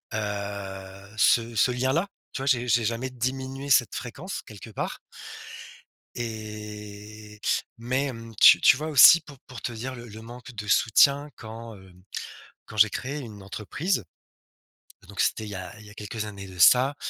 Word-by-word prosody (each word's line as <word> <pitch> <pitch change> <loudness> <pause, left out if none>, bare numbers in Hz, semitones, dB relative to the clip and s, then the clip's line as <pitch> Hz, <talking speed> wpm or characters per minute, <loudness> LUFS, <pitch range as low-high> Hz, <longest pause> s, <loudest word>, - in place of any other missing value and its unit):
heu, 100 -1 -6
ce 115 +1 +3
ce 125 - +4
lien-là, 130 +9 0 0.3
tu 135 - -4
vois, 135 - -4
j'ai 125 -2 +2 0.2
jamais 120 +3 -2
diminué 130 +2 -4
cette 120 -3 +4
fréquence 150 +11 -6
quelque 110 +1 -12
part - - -4 1.2
et 105 -1 -8 0.4
mais, 130 +4 -1
hem, 115 -4 -7
tu - - +8
tu - - +6
vois 155 +1 -4
aussi 155 +3 +9
pour 145 -3 -14
pour 130 -3 -9
te 120 - -4
dire 130 +3 -5
le 120 0 -10
le 110 0 -10
manque 125 +3 -11
de 105 -1 -6
soutien 140 +7 +4
quand, 115 0 -9
heu, 95 -2 -16 0.7
quand - - -12
j'ai 110 +1 +6
créé 140 +7 -4
une 105 -5 -10
entreprise. 110 - -2 1.0
Donc 100 0 -11
c'était 110 - +1
il 105 - -6
a 90 +3 -8
il 105 - -14
y - - -13
a - - -13
quelques 105 +1 -5
années 100 -2 -8
de 90 -1 -12
ça 130 - +6
115 Hz, 165 wpm, -26 LUFS, 105-130 Hz, 1.2 s, aussi